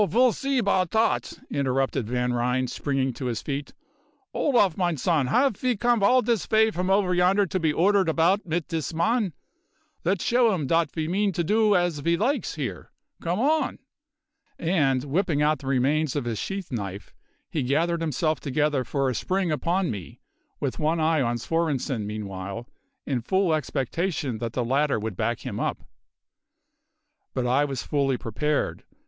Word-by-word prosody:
ve'll 245 +6 +4
see 275 -1 -1
about 195 -6 +2
dot," 220 - +1 0.2
interrupted 135 -4 0
Van 125 0 0
Ryn, 125 +2 +1
springing 135 0 -1
to 125 - -6
his 120 -3 -1
feet. 140 0 -4 0.6
"Olaf, 220 - +2
mine 175 -4 0
zon, 150 -2 +1
haf 250 - +3
ve 250 -3 0
comed 240 0 +2
all 250 +6 +5
dis 230 -3 +1
vay 220 0 +4
from 180 -1 -2
over 195 -2 +3
yonder 185 +3 +3
to 185 +1 -2
be 160 -3 +2
ordered 190 +3 +3
about 170 +6 +2
mit 170 -1 -2
dis 165 0 -3
man? 215 +3 +1 0.7
Let's 185 0 0
show 235 -3 +3
'im 155 -6 -2
dot 165 +1 +2
ve 160 -1 -3
means 195 +1 0
to 170 - 0
do 210 +3 +3
as 175 -4 +1
ve 170 +4 +1
likes 265 +9 0
here. - - -5 0.3
Come 175 +2 -1
on!" 300 +3 +1 0.8
And, 145 -7 +1
whipping 150 0 0
out 150 -1 +2
the 135 - -9
remains 140 +3 +1
of 140 -4 -1
his 115 -3 -2
sheath 195 -4 -4
knife, 100 -4 -5 0.4
he 155 - -1
gathered 165 +6 +1
himself 155 0 0
together 145 -1 0
for 135 +2 -1
a 130 - 0
spring 185 - -1
upon 175 +4 0
me, 100 -6 -8 0.4
with 135 -3 -3
one 160 +2 +1
eye 160 -1 +2
on 120 -1 0
Svorenssen 135 -5 -1
meanwhile, 100 +1 -5 0.4
in 130 -4 -1
full 190 +6 +1
expectation 150 - -2
that 115 -1 -4
the 125 -1 -1
latter 140 +4 +2
would 110 -2 -4
back 115 +5 -1
him - - -5
up. - - -2 1.5
But 130 -2 0
I 130 +4 +3
was 135 -5 -4
fully 140 -3 0
prepared. 150 +7 -2
155 Hz, 170 wpm, -25 LUFS, 130-190 Hz, 1.5 s, all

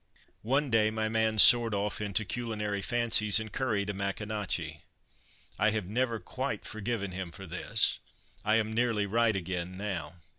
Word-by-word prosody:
One 135 +4 0
day 110 -1 +4
my 110 0 -2
man 110 0 0
soared 115 0 +8
off 100 +1 -2
into 105 +1 -1
culinary 105 -3 -3
fancies 110 -2 +2
and 110 -1 -7
curried 110 -7 -1
a - - -7
Maconochie. 100 -5 -4 0.8
I 110 - +4
have 110 -3 -2
never 115 +3 -1
quite 90 - -5
forgiven 105 -2 -4
him 90 -1 -6
for 95 +3 -10
this; 95 +5 -1 0.4
I 105 +1 +2
am 110 -1 0
nearly 115 -3 +1
right 115 +1 +1
again 90 0 -4
now. 95 -6 -5
105 Hz, 155 wpm, -29 LUFS, 100-115 Hz, 0.8 s, soared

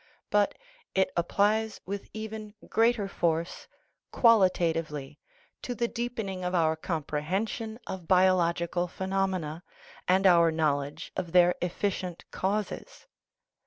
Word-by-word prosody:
But 205 -1 +2 0.4
it 190 -1 +2
applies 210 +5 +1
with 200 +1 -5
even 215 -1 -7
greater 225 -2 +2
force 170 -3 -1 0.4
qualitatively 165 - +2 0.4
to 245 - -4
the 235 0 0
deepening 225 -6 -4
of 180 +1 -1
our 160 -2 +3
comprehension 180 +8 -3
of 180 -3 -6
biological 175 -1 +3
phenom 190 +1 -1
ena, 160 0 -5 0.4
and 190 +2 +3
our 170 -3 +6
knowledge 150 -1 -1
of 175 -2 -4
their 180 0 +6
efficient 180 -1 -2
causes. 210 - -3
185 Hz, 110 wpm, -28 LUFS, 170-205 Hz, 0.4 s, our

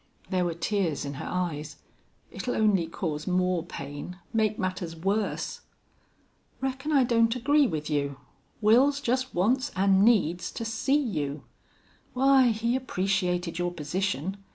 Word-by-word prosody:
There 185 -1 +1
were 170 -1 -2
tears 170 -4 -1
in 140 - -4
her - - -5
eyes. 155 -4 -3 0.6
"It'll 245 - -3
only 205 -6 +2
cause 155 -3 -4
more 180 -2 +1
pain 145 +6 -7 0.2
make 215 -2 +1
matters 185 -3 -3
worse." 200 +5 -2 1.0
"Reckon 270 +3 -3
I 275 -3 +5
don't 230 -1 +3
agree 285 +3 +3
with 155 -5 -3
you. 140 -2 -1 0.5
Wils 260 +7 +5
just 260 -1 -1
wants 250 +10 +2
an' 195 0 +4
needs 180 -7 +2
to 230 - -4
see 225 +6 +1
you. 150 - -2 0.7
Why, 265 0 +5
he 230 +1 +1
appreciated 185 -7 -1
your 175 0 0
position. 180 +2 -2
195 Hz, 135 wpm, -27 LUFS, 170-235 Hz, 1.0 s, I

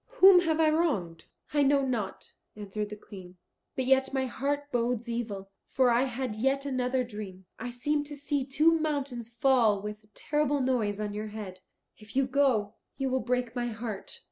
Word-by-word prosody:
Whom 380 -4 +9
have 325 -2 +1
I 315 -1 +5
wronged?" 210 - 0 0.3
"I 295 - +3
know 280 0 +4
not," 230 -7 -3 0.2
answered 210 0 -4
the 210 - -6
Queen, 185 -3 -12 0.4
"but 260 - -1
yet 265 0 +3
my 265 -1 +1
heart 285 +3 -2
bodes 240 -1 0
evil. 215 -5 -4 0.2
For 255 -2 +3
I 240 +3 +3
had 250 -3 -3
yet 270 +5 0
another 255 -1 0
dream. 205 -5 -8
I 245 +2 -4
seemed 290 +5 -1
to 295 - -7
see 285 -1 -1
two 310 +5 +3
mountains 280 -7 -2
fall 235 -3 +3
with 210 +1 -7
a - - -25
terrible 295 -1 0
noise 235 -6 0
on 210 -1 -3
your 210 +1 -4
head. 205 -3 -7 0.4
If 215 +2 -14
you 270 0 +3
go, 255 -6 +2 0.2
you 270 -2 -1
will 260 - +2
break 250 0 -1
my 240 -1 -1
heart." 220 -3 -6
250 Hz, 185 wpm, -29 LUFS, 215-275 Hz, 0.4 s, Whom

